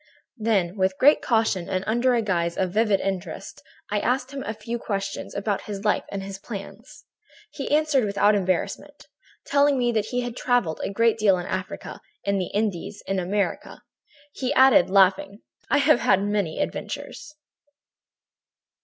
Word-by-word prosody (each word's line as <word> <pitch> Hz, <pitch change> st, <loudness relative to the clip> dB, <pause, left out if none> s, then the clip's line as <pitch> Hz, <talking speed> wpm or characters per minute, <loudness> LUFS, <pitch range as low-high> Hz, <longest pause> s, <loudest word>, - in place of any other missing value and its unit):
"Then, 205 Hz, -4 st, 0 dB
with 190 Hz, 0 st, +1 dB
great 290 Hz, +3 st, +5 dB
caution 220 Hz, -6 st, 0 dB
and 185 Hz, 0 st, -1 dB
under 240 Hz, +3 st, +2 dB
the 230 Hz, -, +1 dB
guise 170 Hz, -4 st, -1 dB
of 185 Hz, -1 st, 0 dB
a -, -, -11 dB
vivid 210 Hz, -2 st, +2 dB
interest, 190 Hz, -1 st, -5 dB, 0.3 s
I 210 Hz, -, +1 dB
asked 255 Hz, +4 st, -1 dB
him 275 Hz, -1 st, -5 dB
a 220 Hz, -, -4 dB
few 230 Hz, +2 st, -5 dB
questions 195 Hz, -2 st, -4 dB
about 200 Hz, 0 st, -2 dB
his 200 Hz, 0 st, -5 dB
life 210 Hz, -, +1 dB
and 195 Hz, -1 st, -4 dB
his 195 Hz, 0 st, -7 dB
plans. 225 Hz, +8 st, -10 dB, 0.5 s
He 275 Hz, -, -5 dB
answered 300 Hz, -5 st, +2 dB
without 205 Hz, +1 st, +3 dB
embarrassment, 185 Hz, -3 st, -2 dB, 0.4 s
telling 285 Hz, 0 st, +3 dB
me 240 Hz, -1 st, +1 dB
that 220 Hz, -2 st, -1 dB
he 250 Hz, +1 st, -1 dB
had 245 Hz, -1 st, -5 dB
travelled 245 Hz, -13 st, 0 dB
a -, -, -2 dB
great 230 Hz, +3 st, +2 dB
deal 200 Hz, -3 st, +4 dB
in 175 Hz, -, -5 dB
Africa, 185 Hz, 0 st, -5 dB, 0.2 s
in 200 Hz, 0 st, 0 dB
the 185 Hz, -, -2 dB
Indies, 205 Hz, -1 st, -3 dB
in 195 Hz, -1 st, -1 dB
America. 195 Hz, +3 st, -2 dB, 0.5 s
He 260 Hz, 0 st, -2 dB
added, 260 Hz, -, +6 dB
laughing: 195 Hz, +1 st, +3 dB, 0.3 s
"'I 280 Hz, -, +3 dB
have 285 Hz, -2 st, +4 dB
had 195 Hz, -1 st, +3 dB
many 205 Hz, -5 st, -1 dB
adventures.' 300 Hz, -, -5 dB
210 Hz, 165 wpm, -24 LUFS, 195-240 Hz, 0.5 s, added